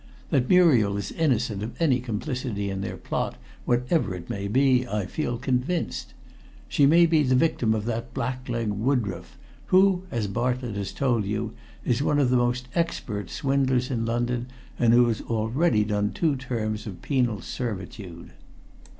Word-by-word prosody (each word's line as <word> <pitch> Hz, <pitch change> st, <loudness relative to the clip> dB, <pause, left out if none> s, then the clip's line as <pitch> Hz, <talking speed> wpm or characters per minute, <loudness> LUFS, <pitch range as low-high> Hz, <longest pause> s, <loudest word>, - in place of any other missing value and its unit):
That 130 Hz, -2 st, +2 dB
Muriel 130 Hz, -, +5 dB
is 100 Hz, -1 st, -4 dB
innocent 120 Hz, -10 st, 0 dB
of 110 Hz, -, -6 dB
any 140 Hz, -7 st, +3 dB
complicity 120 Hz, -3 st, -3 dB
in 95 Hz, 0 st, -3 dB
their 95 Hz, -, -4 dB
plot, -, -, -3 dB, 0.3 s
whatever 125 Hz, -, +1 dB
it 90 Hz, -1 st, -7 dB
may 100 Hz, 0 st, -3 dB
be, 125 Hz, +2 st, +3 dB
I 105 Hz, -3 st, -2 dB
feel 120 Hz, +3 st, -2 dB
convinced. 130 Hz, +7 st, -2 dB, 0.5 s
She 140 Hz, -, +4 dB
may 170 Hz, +4 st, +6 dB
be 160 Hz, -2 st, +3 dB
the 130 Hz, -3 st, +2 dB
victim 125 Hz, -6 st, +2 dB
of 105 Hz, -1 st, -3 dB
that 115 Hz, +1 st, -3 dB
blackleg 120 Hz, -2 st, -3 dB
Woodroffe, 105 Hz, -5 st, -2 dB, 0.3 s
who, 185 Hz, -1 st, +4 dB
as 115 Hz, -, -1 dB
Bartlett 120 Hz, +2 st, -2 dB
has 100 Hz, -1 st, -3 dB
told 120 Hz, -6 st, 0 dB
you, 105 Hz, +2 st, -2 dB, 0.3 s
is 125 Hz, +1 st, +1 dB
one 145 Hz, 0 st, +2 dB
of 135 Hz, -4 st, +3 dB
the -, -, +4 dB
most 120 Hz, +1 st, 0 dB
expert 125 Hz, -11 st, -2 dB
swindlers 135 Hz, -3 st, 0 dB
in 115 Hz, -3 st, -1 dB
London, 120 Hz, +1 st, -1 dB, 0.3 s
and 120 Hz, -1 st, +4 dB
who 120 Hz, 0 st, +6 dB
has 115 Hz, -2 st, -1 dB
already 115 Hz, +2 st, +1 dB
done 105 Hz, -1 st, -1 dB
two 160 Hz, -4 st, +1 dB
terms 115 Hz, -5 st, -3 dB
of 95 Hz, -4 st, -8 dB
penal 125 Hz, -7 st, +1 dB
servitude." 95 Hz, -6 st, -6 dB
120 Hz, 160 wpm, -25 LUFS, 105-135 Hz, 0.5 s, may